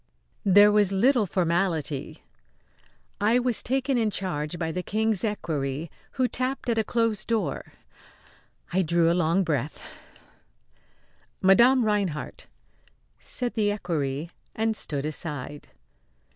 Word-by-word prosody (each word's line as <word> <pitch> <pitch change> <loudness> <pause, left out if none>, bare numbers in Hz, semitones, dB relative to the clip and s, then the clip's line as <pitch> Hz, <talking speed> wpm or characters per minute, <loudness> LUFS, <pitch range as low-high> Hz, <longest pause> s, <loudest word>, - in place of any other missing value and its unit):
There 205 +2 +7
was 205 -2 +3
little 225 +2 +3
formality. 170 -5 -1 1.0
I 220 +4 +3
was 245 -2 +2
taken 265 0 0
in 220 -2 +1
charge 175 -5 -3
by 160 -1 -2
the 180 - -3
King's 220 +1 0
equerry, 155 -8 -3 0.2
who 255 -2 +1
tapped 255 +1 -3
at 225 -1 +1
a - - +2
closed 225 -2 0
door. 225 -2 -2 1.0
I 190 - +3
drew 170 -1 +2
a - - +3
long 175 +2 +2
breath. 150 -3 -2 1.6
"Madame 235 +6 +5
Rinehart!" 200 -8 -2 0.7
said 245 -2 -3
the 210 -2 +1
equerry, 165 -6 -3 0.2
and 220 0 0
stood 145 -7 -2
aside. 145 -2 -5
195 Hz, 115 wpm, -26 LUFS, 160-225 Hz, 1.6 s, There